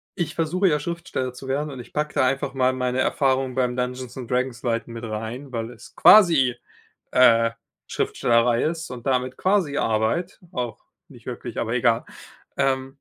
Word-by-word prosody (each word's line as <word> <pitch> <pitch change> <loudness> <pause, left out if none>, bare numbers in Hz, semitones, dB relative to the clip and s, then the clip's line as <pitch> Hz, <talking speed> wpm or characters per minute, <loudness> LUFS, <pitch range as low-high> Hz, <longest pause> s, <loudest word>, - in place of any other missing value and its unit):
ich 175 - -3
versuche 180 +4 +1
ja 150 -3 +2
Schriftsteller 155 -6 -4
zu 130 +1 -10
werden 145 +2 -1
und 130 - -8
ich 120 - -11
packe 150 0 -2
da - - +3
einfach 135 +2 -1
mal 130 -1 +2
meine 125 0 -1
Erfahrungen 130 -1 +1
beim 125 -2 0
Dungeons 125 0 -4
und 125 -3 -7
Dragons 125 -1 -1
leiten 115 0 -2
mit 115 0 -7
rein, 115 +5 -5
weil 115 -1 -4
es - - -15
quasi, 160 - +6 0.6
äh, 115 -2 +5 0.4
Schriftstellerei 115 0 +1
ist 160 0 -2
und 125 -1 -8
damit 130 -1 0
quasi 185 -7 +1
Arbeit, 110 +12 0
auch 120 -4 -4 0.3
nicht 120 -6 -16
wirklich, 120 -2 -7
aber 115 +1 -2
egal. 120 -2 +2 0.5
Ähm 135 -1 +1
130 Hz, 170 wpm, -23 LUFS, 120-140 Hz, 0.6 s, quasi